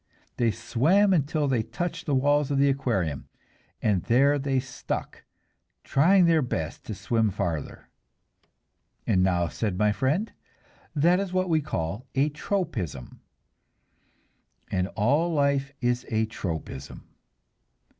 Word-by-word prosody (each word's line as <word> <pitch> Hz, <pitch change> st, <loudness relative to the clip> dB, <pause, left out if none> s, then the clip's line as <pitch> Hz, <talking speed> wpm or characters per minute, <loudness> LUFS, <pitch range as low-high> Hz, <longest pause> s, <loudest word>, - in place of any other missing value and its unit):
They 120 Hz, -2 st, +2 dB
swam 155 Hz, -, +2 dB
until 150 Hz, -2 st, +1 dB
they 130 Hz, -4 st, +1 dB
touched 165 Hz, +9 st, -5 dB
the 145 Hz, -, +2 dB
walls 145 Hz, +1 st, +2 dB
of 140 Hz, -, 0 dB
the 140 Hz, +1 st, +4 dB
aquarium, 100 Hz, -, -1 dB, 0.5 s
and 100 Hz, -5 st, +2 dB
there 140 Hz, +4 st, +4 dB
they 135 Hz, -1 st, 0 dB
stuck, 135 Hz, +1 st, -5 dB, 0.6 s
trying 180 Hz, +6 st, +4 dB
their 165 Hz, -2 st, +4 dB
best 80 Hz, -, -3 dB
to 110 Hz, -, -5 dB
swim 115 Hz, +1 st, +1 dB
farther. 85 Hz, -6 st, -4 dB, 1.2 s
"And 95 Hz, -4 st, +2 dB
now," 90 Hz, -2 st, +2 dB
said 100 Hz, 0 st, -3 dB
my 105 Hz, +1 st, +3 dB
friend, 145 Hz, -, -1 dB, 0.6 s
"that 170 Hz, +5 st, +4 dB
is 195 Hz, -2 st, -3 dB
what 185 Hz, 0 st, +1 dB
we 160 Hz, -2 st, +3 dB
call 105 Hz, -, -4 dB
a 140 Hz, +3 st, +3 dB
'tropism,' 125 Hz, -, -4 dB, 1.5 s
and 90 Hz, -1 st, 0 dB
all 145 Hz, +11 st, +2 dB
life 140 Hz, -2 st, +1 dB
is 120 Hz, 0 st, 0 dB
a 110 Hz, -1 st, +1 dB
tropism. 80 Hz, -, -6 dB
135 Hz, 125 wpm, -26 LUFS, 105-150 Hz, 1.5 s, the